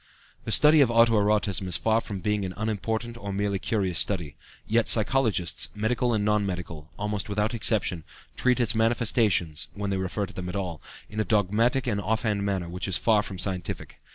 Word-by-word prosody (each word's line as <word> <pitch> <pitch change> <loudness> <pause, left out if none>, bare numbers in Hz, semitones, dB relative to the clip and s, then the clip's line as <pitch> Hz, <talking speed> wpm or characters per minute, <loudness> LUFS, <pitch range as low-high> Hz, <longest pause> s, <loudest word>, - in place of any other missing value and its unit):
The - - -3
study 150 0 +6
of 130 - +4
auto 115 0 +4
erotism 100 -2 +1
is 90 - +4
far 110 0 +1
from 100 -4 -7
being 105 0 -1
an 90 -1 -5
unimportant 110 +2 -3
or 100 -3 -6
merely 100 0 -1
curious 95 -4 0
study. 85 -8 -2 0.3
Yet 115 +1 +1
psychologists, 110 -5 +2
medical 120 +3 0
and 105 -3 0
non 105 -1 +2
medical, 85 -5 -6
almost 105 0 -3
without 105 +2 -1
exception, 100 -6 +1 0.3
treat 125 0 +2
its 120 -2 +2
manifestations 110 -8 +1
when 100 -1 -3
they 95 - 0
refer 95 +2 -2
to - - -13
them 90 -1 -6
at 90 - -6
all 90 -5 -4 0.3
in 105 - -7
a - - +2
dogmatic 110 +5 +1
and 105 -5 -1
off 110 +3 -1
hand 105 -3 0
manner 95 -3 -2
which 90 +3 -4
is 95 - +3
far 110 -2 +3
from 100 -2 -7
scientific. 90 -2 -5
105 Hz, 195 wpm, -26 LUFS, 95-110 Hz, 0.3 s, study